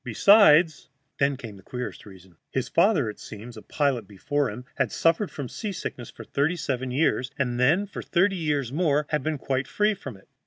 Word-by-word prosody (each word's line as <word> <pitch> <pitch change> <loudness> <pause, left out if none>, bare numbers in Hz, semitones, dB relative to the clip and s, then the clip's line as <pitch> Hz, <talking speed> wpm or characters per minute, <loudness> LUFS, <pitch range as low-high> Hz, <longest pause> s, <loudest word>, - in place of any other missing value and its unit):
Besides 160 - +5
" 135 - -49
Then 140 -1 +2
came 115 -6 -9
the - - -14
queerest 125 +2 -7
reason. 95 -2 -15
His 130 - -2
father, 170 - +3
it 105 - -6
seems, 115 +3 -10
a 110 - -9
pilot 135 -7 -1
before 140 +7 -1
him, 120 +4 -8
had - - -1
suffered 165 +5 +2
from 140 -3 -6
seasickness 175 - -6
for - - -11
thirty 150 +5 0
seven 130 -6 -3
years, 130 -1 +1
and 125 -3 -1
then 160 +11 +3
for 200 - -7
thirty 185 +3 +1
years 145 -7 -1
more 150 -2 +1
had 150 -2 0
been 155 +2 -2
quite 135 -1 -2
free 210 +1 +1
from 135 - -9
it. 95 - -22
140 Hz, 200 wpm, -25 LUFS, 125-165 Hz, -, Besides